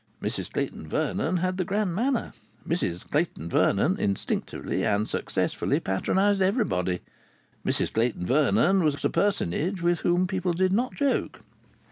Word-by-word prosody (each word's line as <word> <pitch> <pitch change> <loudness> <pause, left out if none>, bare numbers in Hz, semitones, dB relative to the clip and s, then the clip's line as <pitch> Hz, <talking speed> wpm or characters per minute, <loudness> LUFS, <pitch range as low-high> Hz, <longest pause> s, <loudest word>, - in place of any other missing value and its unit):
Mrs - - -4
Clayton 80 - -3
Vernon 160 - 0
had 185 +1 -1
the 185 - +1
grand 195 0 -1
manner. 240 +6 0 0.3
Mrs 90 - -2
Clayton 145 - -1
Vernon - - +2
instinctively 100 -1 -2
and 105 -1 +1
successfully - - -1
patronized 195 - +1
everybody. 140 - +1 0.6
Mrs - - -1
Clayton 115 -5 0
Vernon 150 - +3
was 150 -2 0
a - - +2
personage 185 - 0
with 175 -1 +2
whom 175 +1 +2
people 185 -1 -1
did 185 +2 +1
not 245 +5 0
joke. 280 -2 0
175 Hz, 135 wpm, -26 LUFS, -, 0.6 s, Vernon